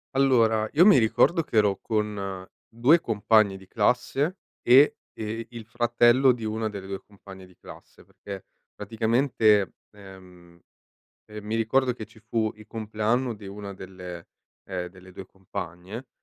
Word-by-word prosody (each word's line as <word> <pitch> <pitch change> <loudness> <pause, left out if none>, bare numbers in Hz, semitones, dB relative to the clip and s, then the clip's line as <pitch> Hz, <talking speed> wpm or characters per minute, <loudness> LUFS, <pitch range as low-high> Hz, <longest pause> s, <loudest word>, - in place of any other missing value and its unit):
Allora, 115 -5 +3
io 165 +5 +6
mi 195 -10 +7
ricordo 145 +9 +3
che 115 - -4
ero 100 -2 +3
con 100 -4 -3 0.2
2 125 +9 +4
compagni 110 -4 +2
di 95 - -15
classe 125 - 0 0.2
e, 135 +4 +5 0.2
ehm, 110 +1 -5
il 115 -2 -10
fratello 120 +3 +3
di 120 -2 -8
una 110 0 -2
delle 100 -2 -8
2 95 0 -6
compagne 95 -2 -14
di 90 - -23
classe, - - -15
perché 100 -2 -10 0.3
praticamente, 110 -1 +1 0.2
ehm, 90 -4 -16 0.7
ehm, 105 -1 -10
mi 105 +1 -3
ricordo 125 +3 +1
che 115 -2 -8
ci 110 +2 -20
fu 110 0 -1
il 110 0 -15
compleanno 110 +3 -1
di 105 -1 -12
una 100 0 -8
delle 90 -2 -9 0.4
ehm, 90 -2 -4
delle 95 0 -16
2 95 - -9
compagne, 95 +5 -8
110 Hz, 150 wpm, -26 LUFS, 95-120 Hz, 0.7 s, mi